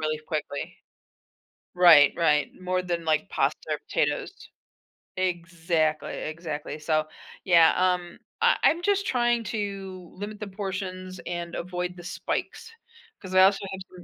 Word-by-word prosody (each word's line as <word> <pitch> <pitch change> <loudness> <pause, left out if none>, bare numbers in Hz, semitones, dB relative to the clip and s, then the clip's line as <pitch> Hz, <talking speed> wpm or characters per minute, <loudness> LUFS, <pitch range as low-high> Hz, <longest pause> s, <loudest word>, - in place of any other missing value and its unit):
really 155 0 -1
quickly. 150 -3 -4 1.0
Right, 165 -5 +8
right, 150 -3 +2
more 185 0 0
than, 175 -2 -2
like, 155 +2 +1
pasta - - +1
or - - -1
potatoes. - - -1 0.9
Exactly, 170 -3 -1
exactly, 155 -1 -5
so, 155 0 +1 0.4
yeah, 170 -3 +6
um, 180 -1 0 0.2
I - - +4
I'm 335 - +4
just 400 +1 +1
trying 240 - +1
to 195 -4 -5
limit 205 +2 -7
the 210 - -5
portions 190 -2 -5
and 175 -1 -4
avoid 180 0 -4
the 175 - -11
spikes, 185 - -4 0.5
'cause 185 -1 -6
I 185 - +8
also 195 +1 +5
have 190 0 -6
some 180 -1 -13
180 Hz, 135 wpm, -26 LUFS, 165-190 Hz, 1.0 s, Right